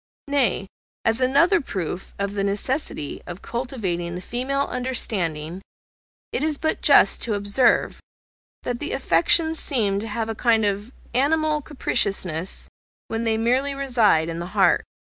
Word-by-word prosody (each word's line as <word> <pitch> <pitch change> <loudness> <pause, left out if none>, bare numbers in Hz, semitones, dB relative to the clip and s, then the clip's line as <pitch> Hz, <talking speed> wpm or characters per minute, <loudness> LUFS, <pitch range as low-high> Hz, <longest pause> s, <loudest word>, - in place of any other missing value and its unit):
Nay, 265 -9 +2 0.4
as 225 +2 +2
another 285 +10 +4
proof 185 - -5
of 200 0 -2
the 200 -1 -2
necessity 200 - -2
of 175 +2 -8
cultivating 195 -9 -3
the 180 - -6
female 260 +7 -1
understanding, 190 - -2 0.7
it - - 0
is 305 -1 0
but 315 +1 0
just - - +5
to 225 -3 +2
observe, 205 +5 +2 0.6
that 245 -1 -3
the 295 - -3
affections 290 - +3
seem 210 -8 +1
to 220 - -5
have 220 +1 -3
a 225 - -3
kind 225 -1 +3
of 205 +3 -2 0.2
animal 305 +3 +2
capriciousness 195 - -1 0.4
when 225 +1 -2
they 220 -1 +1
merely 255 +5 +1
reside 235 -12 +2
in 165 0 -4
the 175 - -5
heart. - - +4
225 Hz, 145 wpm, -23 LUFS, 195-270 Hz, 0.7 s, just